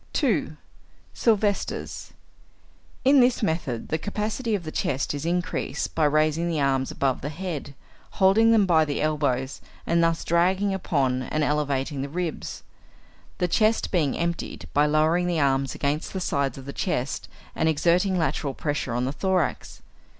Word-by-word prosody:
2. 190 - 0 0.6
Silvester's. 210 -3 0 0.9
In 275 +1 +6
this 245 -2 +3
method 160 - -2
the 160 - 0
capacity 215 +4 -2
of 190 - -4
the 155 - -6
chest 140 -1 -1
is 145 +3 -4
increased 180 +1 -2
by 160 - +2
raising 155 +3 +2
the 160 -3 -1
arms 135 -2 +1
above 135 -2 -1
the 145 - -3
head, 155 -4 -5 0.4
holding 210 +4 +5
them 220 -3 +5
by 165 -4 +4
the 145 -2 -2
elbows, 140 -4 -1 0.2
and 170 0 +2
thus 165 0 +1
dragging 185 +4 +2
upon 135 -9 0
and 155 +4 -1
elevating 145 -1 -1
the 140 - -4
ribs, 175 +1 -4 0.7
the 180 - +1
chest 215 +5 +2
being 155 -7 +1
emptied 170 0 -3
by 145 +1 +4
lowering 160 +4 +2
the 175 -2 0
arms 135 -1 +1
against 145 +2 -2
the 190 - -2
sides 140 -6 -1
of 135 - -9
the 140 - -6
chest 135 -8 -2 0.3
and 160 - +2
exerting 175 +5 +2
lateral 145 -4 -1
pressure 145 -5 -2
on 125 +1 0
the 130 - -1
thorax. 185 -2 -1
160 Hz, 155 wpm, -25 LUFS, 140-185 Hz, 0.9 s, In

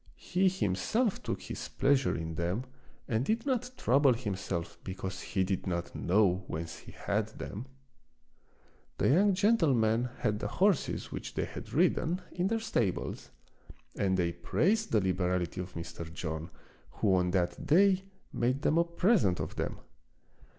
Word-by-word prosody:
He 185 +2 +1
him 180 - 0
self 215 - 0
took - - -4
his - - -5
pleasure 135 -1 +2
in 80 0 -4
them 85 +8 -1 0.4
and 110 +1 +1
did 225 - 0
not 250 -2 0
trouble 135 +1 +4
himself 95 -7 -4
because 95 0 -5
he 95 - 0
did 95 0 -2
not 85 -2 -2
know 95 0 +2
whence 80 +1 -5
he - - -12
had - - -1
them. 115 +7 -6 1.3
The - - +2
young 190 +7 +4
gentlemen 130 - +3
had 105 0 0
the - - -2
horses 195 -4 +1
which - - -6
they - - 0
had - - -8
ridden 175 +3 +2
in 180 +1 0
their 225 +2 0
stables, 120 - -1 0.7
and 95 -2 +1
they 85 -2 +1
praised 215 - +1
the 110 - +4
liberality 90 -1 0
of 90 0 -8
Mr. 85 0 -6
John, 80 -1 -4 0.4
who 100 - +2
on 90 -1 +3
that 90 -1 -1
day 190 +4 +5 0.3
made 130 +4 0
them 160 - +3
a - - +5
present 170 - +2
of - - -4
them. - - -3
110 Hz, 155 wpm, -31 LUFS, -, 1.3 s, day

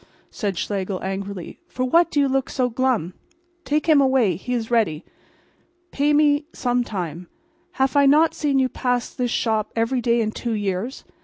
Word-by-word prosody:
cried 200 -4 -2
Schlegel, 195 -1 -3
angrily. 195 -1 -5
"For 255 - -4
what 335 +6 +4
do 295 - 0
you 280 - +3
look 270 0 0
so 255 -2 0
glum? 235 -8 0 0.5
Take 300 +2 0
him 305 -3 +6
away. 260 -9 +3
He 220 +9 -7
is 230 -1 -3
ready. 210 -10 +1 0.9
Pay 290 +1 +1
me 295 0 +3
some 245 -1 0
time. 175 -6 -5 0.5
Haf 265 +1 0
I 280 -1 +5
not 310 +4 +4
seen 285 -3 0
you 260 -1 +3
pass 250 -1 -2
mine 250 - +1
shop 220 -2 -1
every 235 +3 0
day 235 0 +2
in 215 -1 -1
two 235 +1 -4
years? 205 +4 -3
245 Hz, 175 wpm, -22 LUFS, 205-270 Hz, 0.9 s, him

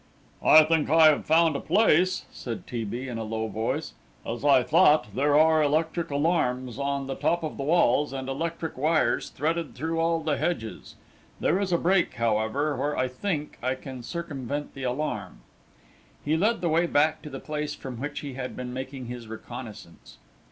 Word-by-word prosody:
"I 155 0 +8
think 155 -2 +1
I 160 0 +7
have 150 - 0
found 160 -1 +4
a - - -1
place," 185 -1 +2
said 115 -3 -6
T. 120 -2 -4
B., 120 +6 -5
in 120 -3 -4
a - - -3
low 110 0 -3
voice. 110 +1 -3 0.3
"As 120 +3 -5
I 140 -3 +5
thought, 150 -8 +4
there 145 +3 +3
are 160 0 +5
electric 160 +3 0
alarms 140 -5 0
on 140 0 -1
the 135 - -3
top 170 +5 0
of 155 - -4
the - - -3
walls, 150 -3 +3
and 135 -1 -5
electric 160 +2 -4
wires 155 +2 +1
threaded 165 +1 -2
through 160 +5 -2
all 165 0 +1
the 155 -3 0
hedges. 115 -11 -3 0.4
There 185 - +2
is 195 -2 -1
a 170 - +3
break, 180 +1 +1
however, 115 +6 0
where, 145 +3 -2
I 130 - +1
think, 150 +2 -4
I 130 +2 0
can 130 -1 -9
circumvent 145 -1 -5
the 135 - -9
alarm." 125 -7 -3 0.8
He 150 +2 +2
led 215 +8 +1
the 170 - 0
way 165 +2 +2
back 155 0 +2
to 150 - -8
the 135 -1 -7
place 150 -1 -4
from 130 -3 -8
which 145 +2 -4
he 140 -2 -6
had 125 0 -5
been 125 -1 -6
making 130 0 -6
his 120 -1 -7
reconnaissance. 110 -5 -10
145 Hz, 185 wpm, -26 LUFS, 125-160 Hz, 0.8 s, I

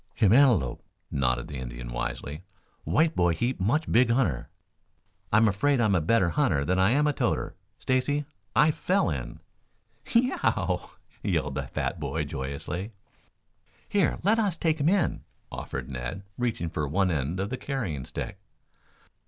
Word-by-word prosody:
"Him 105 -2 +4
antelope," 115 - +4 0.3
nodded 60 -3 0
the 70 -3 -6
Indian - - -6
wisely. 70 +5 -4 0.4
"White 155 - +2
boy 85 -1 +3
heap 120 +7 -1
much 125 +12 +1
big 120 +1 +5
hunter." 115 - +1 0.8
"I'm 110 +1 +5
afraid 125 +7 +2
I 115 - +3
am 105 - +3
a 90 - +3
better 90 +2 +3
hunter 70 -2 +1
than 90 +4 +1
I 95 +1 +5
am 145 +5 +3
a 150 - +2
toter. - - -1 0.2
Stacy, 145 +3 0 0.3
I 150 +7 +6
fell 185 - +1
in." 60 -5 -5 0.7
"Ye 235 - +5
e 250 - 0
e - - -3
ow!" - - 0 0.3
yelled 70 0 0
the 70 -1 -3
fat 85 - -3
boy 75 +1 -2
joyously. 70 - -5 0.9
"Here, 200 -5 +2
let 215 +5 +3
us 200 -6 +1
take 160 -1 +1
him 145 +3 +3
in," 195 -1 +1 0.3
offered 65 0 -5
Ned, 60 +9 -5
reaching 110 -9 -2
for 75 -2 -2
one 95 +5 +1
end 80 +3 -1
of 100 +3 -2
the - - 0
carrying 115 - -3
stick. 95 - -6
95 Hz, 165 wpm, -27 LUFS, -, 0.9 s, I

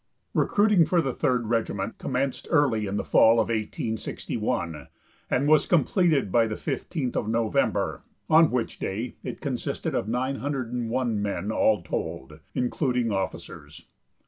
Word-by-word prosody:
Recruiting 205 -4 +4
for 175 +2 +2
the 135 -6 0
Third 125 -5 0
Regiment 110 -2 -2
commenced 135 0 -2
early 130 - +2
in 100 +1 -2
the - - -1
fall 110 - +5
of 115 -1 +1
1861, 105 -7 -3 0.4
and 135 +3 +1
was 155 -1 +4
completed 160 - +2
by 115 +1 +4
the 110 - -3
15th 135 0 -3
of - - -1
November, 115 -1 0 0.3
on 160 0 +6
which 125 -2 -2
day 110 +6 -3
it - - -6
consisted - - -3
of 95 - -1
901 125 -2 -1
men 100 0 -2
all 105 -4 +2
told, 75 -2 -5 0.2
including 125 -2 0
officers. 80 -6 -5
120 Hz, 135 wpm, -26 LUFS, 105-140 Hz, 0.4 s, on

